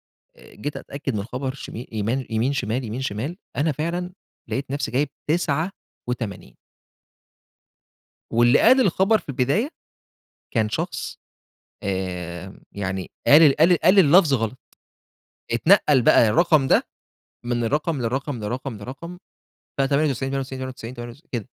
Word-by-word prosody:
وجيت 145 Hz, +7 st, -9 dB
أتأكد 140 Hz, -3 st, -5 dB
من 100 Hz, -, -2 dB
خبر 130 Hz, +4 st, -4 dB
شم 135 Hz, -, -9 dB, 0.2 s
يمان 115 Hz, +4 st, -1 dB
يمين 115 Hz, +5 st, 0 dB
شمال، 125 Hz, -1 st, -2 dB
يمين 115 Hz, +3 st, -4 dB
شمال، 135 Hz, -, -3 dB, 0.2 s
أنا 150 Hz, +2 st, +2 dB
فعلًا 175 Hz, +5 st, -3 dB, 0.4 s
لقيت 135 Hz, 0 st, -3 dB
نَفسي 140 Hz, 0 st, -2 dB
جايب 140 Hz, +3 st, +1 dB, 0.2 s
89. 145 Hz, -, -3 dB, 1.8 s
واللي 120 Hz, +3 st, +4 dB
قال 260 Hz, +1 st, +6 dB
الخبر 195 Hz, 0 st, +3 dB
في -, -, -17 dB
البداية 140 Hz, -, 0 dB, 0.8 s
كان 110 Hz, -3 st, +1 dB
شخص، 105 Hz, -, -4 dB, 0.6 s
آآ، 95 Hz, -1 st, -4 dB
يعني 95 Hz, -2 st, -4 dB, 0.2 s
قال 150 Hz, -1 st, +7 dB
قال 170 Hz, +3 st, +5 dB
قال 185 Hz, +3 st, +5 dB
اللفظ 170 Hz, -3 st, +6 dB
غلط، 115 Hz, 0 st, -2 dB, 0.9 s
اتنقَّل 145 Hz, -, +4 dB
بقى 115 Hz, -, +5 dB
الرقم 155 Hz, 0 st, +3 dB
ده -, -, +4 dB, 0.6 s
من 120 Hz, -1 st, -1 dB
الرقم 150 Hz, +4 st, 0 dB
لرقم، 130 Hz, +2 st, -2 dB
لرقم، 120 Hz, +3 st, -4 dB
لرقم، 140 Hz, +11 st, -8 dB, 0.6 s
ف98، 135 Hz, -1 st, +1 dB
98، 135 Hz, -1 st, -3 dB
98، 130 Hz, -2 st, -6 dB
98، 120 Hz, +3 st, -9 dB
كده 120 Hz, -, -2 dB
135 Hz, 120 wpm, -23 LUFS, 115-150 Hz, 1.8 s, قال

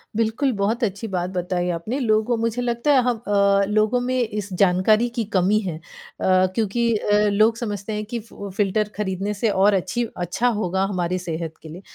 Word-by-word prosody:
बिल्कुल, 230 Hz, +5 st, +1 dB
बहुत 215 Hz, +5 st, 0 dB
अच्छी 205 Hz, +1 st, -2 dB
बात 180 Hz, -2 st, -2 dB
बताई 180 Hz, 0 st, -1 dB
आपने। 215 Hz, +12 st, -4 dB
लोगों 220 Hz, 0 st, +2 dB
मुझे 230 Hz, +1 st, -1 dB
लगता 240 Hz, +4 st, 0 dB
है 265 Hz, -, +5 dB
हम 245 Hz, -2 st, 0 dB
अ, 200 Hz, -1 st, +3 dB
लोगों 215 Hz, +3 st, +2 dB
में 255 Hz, +1 st, -1 dB
इस 210 Hz, -2 st, -5 dB
जानकारी 200 Hz, +5 st, +4 dB
की 235 Hz, -, 0 dB
कमी 190 Hz, +4 st, +3 dB
है 180 Hz, -7 st, -4 dB
अ, 165 Hz, -, -15 dB, 0.7 s
क्योंकि 225 Hz, +1 st, 0 dB
अ, 205 Hz, 0 st, +1 dB
लोग 215 Hz, +3 st, +3 dB
समझते 210 Hz, -2 st, -4 dB
हैं 210 Hz, 0 st, -3 dB
कि 235 Hz, +3 st, -4 dB
फु 205 Hz, -2 st, -9 dB
फ़िल्टर 210 Hz, +1 st, +1 dB
ख़रीदने 200 Hz, 0 st, -2 dB
से 210 Hz, +2 st, 0 dB
और 200 Hz, +1 st, +3 dB
अच्छी 220 Hz, +5 st, 0 dB, 0.2 s
अच्छा 225 Hz, +8 st, 0 dB
होगा 190 Hz, -1 st, 0 dB
हमारी 180 Hz, -1 st, -1 dB
सेहत 165 Hz, -2 st, -4 dB
के 160 Hz, -, -11 dB
लिए। 175 Hz, +5 st, -9 dB
210 Hz, 190 wpm, -22 LUFS, 190-230 Hz, 0.7 s, है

